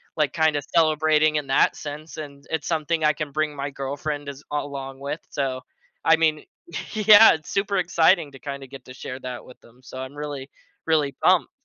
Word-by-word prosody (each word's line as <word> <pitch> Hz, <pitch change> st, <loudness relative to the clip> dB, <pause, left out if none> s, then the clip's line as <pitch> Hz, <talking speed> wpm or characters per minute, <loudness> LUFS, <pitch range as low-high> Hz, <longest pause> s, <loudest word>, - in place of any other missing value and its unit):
like, 150 Hz, -4 st, +1 dB
kinda 160 Hz, -2 st, +2 dB
celebrating 155 Hz, -1 st, +3 dB
in 145 Hz, -2 st, -3 dB
that 135 Hz, -, +3 dB
sense, 150 Hz, +2 st, -8 dB
and 140 Hz, -2 st, -9 dB
it's 160 Hz, -2 st, -2 dB
something 160 Hz, 0 st, 0 dB
I 150 Hz, 0 st, +4 dB
can 150 Hz, -1 st, -5 dB
bring 155 Hz, +1 st, -1 dB
my 140 Hz, 0 st, -4 dB
girlfriend 145 Hz, +2 st, -4 dB
as 140 Hz, +1 st, -9 dB
along 140 Hz, -2 st, -4 dB
with. 140 Hz, +3 st, -4 dB
So, 130 Hz, -2 st, -2 dB, 0.4 s
I 160 Hz, -, +7 dB
mean 155 Hz, -2 st, +1 dB, 0.5 s
yeah, 215 Hz, 0 st, +8 dB
it's 155 Hz, -2 st, -7 dB
super 200 Hz, 0 st, 0 dB
exciting 170 Hz, -3 st, +3 dB
to 135 Hz, -, -13 dB
kinda 140 Hz, -1 st, -6 dB
get 135 Hz, -1 st, -12 dB
to 130 Hz, -, -11 dB
share 130 Hz, 0 st, -7 dB
that 125 Hz, -2 st, -7 dB
with 125 Hz, -, -15 dB
them. 120 Hz, +2 st, -21 dB
So 130 Hz, -, -10 dB
I'm 130 Hz, +1 st, -6 dB
really, 145 Hz, -2 st, -6 dB, 0.4 s
really 155 Hz, -3 st, +2 dB
pumped. 180 Hz, -2 st, +3 dB
150 Hz, 190 wpm, -24 LUFS, 140-160 Hz, 0.5 s, yeah